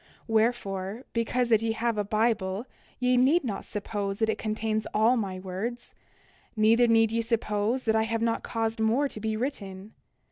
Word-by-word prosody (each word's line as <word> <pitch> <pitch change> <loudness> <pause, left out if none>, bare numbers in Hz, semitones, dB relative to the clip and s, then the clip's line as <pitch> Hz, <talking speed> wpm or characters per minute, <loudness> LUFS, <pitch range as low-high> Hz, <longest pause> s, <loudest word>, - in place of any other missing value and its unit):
29:10 - - -29 0.2
Wherefore, 220 -1 0
because 235 +1 0
that 220 -2 +4
ye 225 0 0
have 230 0 -1
a 210 - 0
Bible 215 -1 0 0.3
ye 250 0 +2
need 280 +7 +4
not 215 -6 -3
suppose 200 -1 -3
that 220 0 +1
it - - -1
contains 215 0 -2
all 220 +4 +4
my 195 -5 -2
words; 195 +6 -5 0.6
neither 225 +2 +4
need 225 -1 +4
ye 230 0 +1
suppose 225 +1 -1
that 220 -1 +2
I 220 - +3
have 230 0 -1
not 230 -1 0
caused 225 -1 -2
more 230 +6 +2
to 220 - -7
be 220 0 -2
written. 205 -5 -5
225 Hz, 180 wpm, -27 LUFS, 210-235 Hz, 0.6 s, that